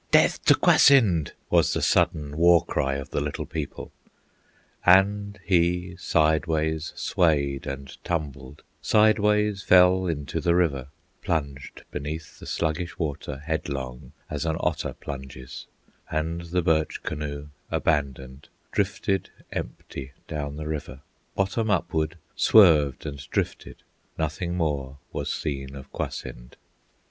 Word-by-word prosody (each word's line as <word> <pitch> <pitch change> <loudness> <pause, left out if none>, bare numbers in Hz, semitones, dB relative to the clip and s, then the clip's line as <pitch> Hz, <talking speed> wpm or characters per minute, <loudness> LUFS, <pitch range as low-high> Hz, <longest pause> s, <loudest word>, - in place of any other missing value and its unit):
"Death - - +4
to - - +7
Kwasind!" 105 - +5 0.2
was - - +4
the - - -1
sudden 75 -1 +2
War 85 +1 +5
cry 70 0 0
of 70 -1 -6
the - - -1
Little 75 0 -3
People. 80 -4 -6 0.9
And 100 +3 +4
he 90 0 +1
sideways 80 -1 +1
swayed 70 -5 +1
and 70 0 -6
tumbled, 75 -5 -4 0.2
Sideways 105 -1 +3
fell 90 0 +5
into 75 -4 -3
the 85 -1 +2
river, 70 -7 +1 0.3
Plunged 70 -7 -3
beneath 80 +3 -6
the - - -10
sluggish 85 +2 -2
water 75 -3 -4
Headlong, 70 -6 -4 0.2
as 75 -2 -3
an 80 -1 -1
otter - - -1
plunges; 65 -2 -8 0.4
And 80 +2 -2
the 90 +1 -1
birch 80 -2 +1
canoe, 75 -1 -5 0.2
abandoned, 70 -3 -1 0.2
Drifted 95 -1 0 0.2
empty 65 +2 -6
down 75 -2 -4
the 75 0 -6
river, 75 -3 -5 0.3
Bottom 100 +3 0
upward 80 -4 0 0.2
swerved 80 - +5
and 70 -2 -5
drifted: - - -3 0.3
Nothing 80 +3 -2
more 70 -5 -2
was - - -3
seen 70 -2 -4
of 65 0 -11
Kwasind. - - -6
80 Hz, 120 wpm, -25 LUFS, 70-90 Hz, 0.9 s, to